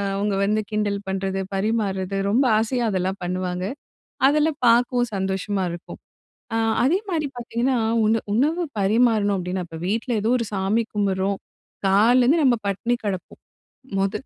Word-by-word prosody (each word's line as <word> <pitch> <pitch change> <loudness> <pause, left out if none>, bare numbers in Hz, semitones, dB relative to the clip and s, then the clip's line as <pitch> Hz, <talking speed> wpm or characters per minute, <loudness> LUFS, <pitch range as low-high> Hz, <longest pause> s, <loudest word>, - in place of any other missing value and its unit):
அவங்க 200 0 0
வந்து 215 +2 +1
கிண்டல் 210 -1 0
பண்றது, 190 0 -2 0.2
பரிமாறது, 195 -2 -1
ரொம்ப 245 +7 +3
ஆசையா 240 +3 0
அதெல்லாம் 190 +1 -1
பண்ணுவாங்க. 180 0 -2 0.6
அதெல்லாம் 300 +1 +1
பார்க்கவும் 245 0 +3
சந்தோஷமா 190 +1 -1
இருக்கும். 170 0 -9 0.6
அ - - +1 0.3
அதே 320 +9 +3
மாரி 315 -4 0
பார்த்தீங்கன்னா, 240 +2 -1 0.3
உணவு 220 +1 +2
உணவு 305 +9 +2 0.2
பரிமாறனும் 210 0 +3
அப்டின்னா, 180 0 -3
இப்ப 165 -1 -8
வீட்ல 230 +4 -1
ஏதோ 220 - +1
ஒரு 230 - -2
சாமி 200 +4 +1
கும்பிடுறோம், 195 -1 0 0.5
காலைல 225 +6 +5
இருந்து 310 +6 +3
நம்ம 245 -3 +4
பட்டினி 235 +5 0
கெடப்போம். 190 -3 -5 0.6
முதல் 195 +6 -1
210 Hz, 140 wpm, -23 LUFS, 190-240 Hz, 0.6 s, காலைல